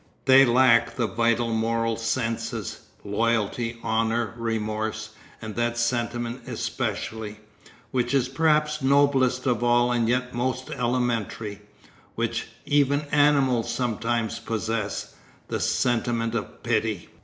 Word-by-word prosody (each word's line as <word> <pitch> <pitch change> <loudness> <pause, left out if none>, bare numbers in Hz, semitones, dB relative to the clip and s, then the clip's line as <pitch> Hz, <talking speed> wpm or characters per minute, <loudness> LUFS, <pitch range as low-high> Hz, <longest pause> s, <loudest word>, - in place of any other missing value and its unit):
They 135 0 +8
lack 115 -2 +4
the 120 - 0
vital 115 +2 +1
moral 115 0 0
senses, 115 -1 -2 0.3
loyalty, 115 +2 0
honour, 110 0 0
remorse, 110 -1 -3 0.3
and 110 -1 -6
that 120 0 0
sentiment 120 0 -2
especially, 105 0 -4 0.5
which 125 -1 0
is 130 -2 +2
perhaps 150 +2 +1
noblest 135 -2 +3
of 120 -2 +1
all 120 0 +3
and 120 -2 +1
yet 125 +1 0
most 130 +1 -2
elementary, 115 -4 -2 0.5
which - - -2 0.2
even 145 0 +3
animals 140 -5 +3
sometimes 115 -1 -1
possess, 110 -2 -3 0.4
the - - -2
sentiment 115 -1 0
of 115 - -5
pity. 110 -5 -1
115 Hz, 110 wpm, -25 LUFS, 115-125 Hz, 0.5 s, They